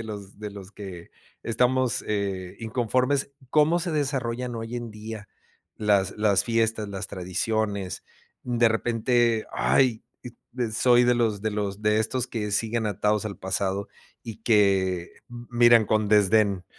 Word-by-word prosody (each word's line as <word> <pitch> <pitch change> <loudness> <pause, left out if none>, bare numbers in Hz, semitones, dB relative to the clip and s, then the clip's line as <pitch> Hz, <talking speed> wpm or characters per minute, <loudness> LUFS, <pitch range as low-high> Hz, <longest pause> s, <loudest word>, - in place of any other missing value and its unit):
de 115 - -6
los 100 -2 -9
de 105 -1 -6
los 100 -1 -10
que 95 -5 -9 0.3
estamos, 125 +1 +1
eh, 95 -3 -3
inconformes 125 +5 0 0.2
como 155 +4 +4
se 175 0 -2
desarrollan 125 -4 -2
hoy 115 +1 -5
en 120 -2 -6
día 105 -1 -8 0.5
las, 100 -2 +1
las 105 -3 +3
fiestas, 115 -2 0
las 100 -1 -4
tradiciones. 100 +1 -2 0.4
De 120 -2 +2
repente, 115 0 +1
ay, 125 -5 +2 0.5
d 120 -3 -3
soy 120 +1 +4
de 125 - +4
los 110 -4 0
de 110 - 0
los 105 0 -3
de 105 0 +2
estos 125 +3 -1
que 105 -4 -4
siguen 110 +1 0
atados 105 +1 0
al 100 - -6
pasado 95 +1 -1 0.3
y 110 -2 -8
que 95 -5 +2 0.2
miran 120 -1 +3
con 110 0 +1
desdén, 100 -2 +3
110 Hz, 145 wpm, -25 LUFS, 100-120 Hz, 0.5 s, como